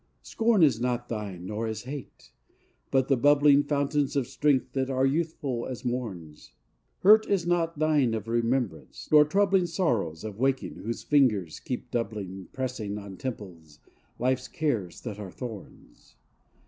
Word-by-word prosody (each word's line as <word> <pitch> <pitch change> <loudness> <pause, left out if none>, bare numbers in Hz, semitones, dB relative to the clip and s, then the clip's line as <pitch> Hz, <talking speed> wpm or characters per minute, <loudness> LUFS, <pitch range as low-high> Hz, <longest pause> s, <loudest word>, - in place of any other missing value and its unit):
Scorn 225 -5 +2
is 125 -7 +3
not 120 -1 -1
thine 100 -6 -5
nor 105 +3 -3
is 110 -1 -4
hate; 135 +1 -9 0.6
but 135 -1 +2
the 135 - +4
bubbling 145 +2 +5
Fountains 145 -1 0
of 140 -3 +1
strength 145 +1 +1
that 135 -1 -1
are 130 0 +1
youthful 140 -4 -1
as 130 -1 -7
morn's: 95 -12 -5 0.5
Hurt 215 +3 +6
is 195 -4 +1
not 170 -2 0
thine 145 -6 +2
of 110 0 -5
remembrance; 120 0 -2
nor 150 -1 +8
troubling 195 +2 +2
Sorrows 115 - -1
of 110 -1 -7
waking 135 +1 0
whose 115 +1 -5
fingers 110 - +2
keep 125 -1 -5
doubling 100 -5 -4
Pressing 120 -6 -4
on 100 -2 -8
temples 90 - -7 0.4
life's 130 +1 0
cares 115 - -2
that 105 -4 -6
are 100 -2 -6
thorns. 115 -2 -10
125 Hz, 150 wpm, -27 LUFS, 110-145 Hz, 0.6 s, nor